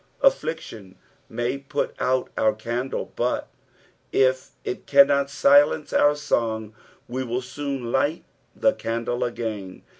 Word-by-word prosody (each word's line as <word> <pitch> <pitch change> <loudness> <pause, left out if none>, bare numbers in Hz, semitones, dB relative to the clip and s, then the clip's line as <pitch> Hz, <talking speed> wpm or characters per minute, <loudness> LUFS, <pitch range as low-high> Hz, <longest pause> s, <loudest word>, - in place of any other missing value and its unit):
Affliction 115 - 0 0.3
may 120 +3 -2
put 140 - -3
out 130 0 +1
our 110 0 +3
candle, 120 +4 -4
but - - -1 0.6
if 130 0 +2
it - - -5
cannot 140 0 +5
silence 145 +2 +4
nur 145 0 +4
song 110 -7 -1 0.3
we 130 +2 -3
will 125 +1 -3
soon 135 -2 -4
light 145 +5 0 0.3
the 275 - +3
candle 115 +2 -2
again. 110 -6 -4
130 Hz, 120 wpm, -24 LUFS, 115-140 Hz, 0.6 s, cannot